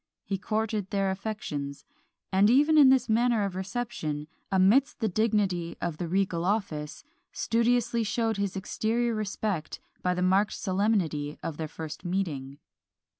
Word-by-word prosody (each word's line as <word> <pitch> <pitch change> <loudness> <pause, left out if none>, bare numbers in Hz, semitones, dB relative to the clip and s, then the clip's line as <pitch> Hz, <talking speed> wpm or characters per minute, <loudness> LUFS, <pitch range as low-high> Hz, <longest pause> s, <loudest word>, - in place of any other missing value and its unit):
He 195 -1 -2
courted 215 -1 -1
their 195 -1 +1
affections; 185 -9 -5 0.5
and 195 +2 +5
even 295 +6 +5
in 290 -4 +8
this 260 -2 +4
manner 230 -1 +2
of 195 - -3
reception, 190 -7 -3 0.2
amidst 205 +10 +4
the 225 - +1
dignity 200 -5 0
of 170 -3 -3
the 175 - -3
regal 185 -1 0
office, 175 -7 -2 0.3
studiously 235 0 +1
showed 225 +1 0
his 200 -1 -2
exterior 225 +4 -1
respect 205 -5 -3 0.2
by 180 0 +1
the 180 - 0
marked 195 +3 +3
solemnity 185 -7 0
of 155 - -4
their 160 - -3
first 155 0 -7
meeting. 155 -7 -3
195 Hz, 140 wpm, -28 LUFS, 175-225 Hz, 0.5 s, in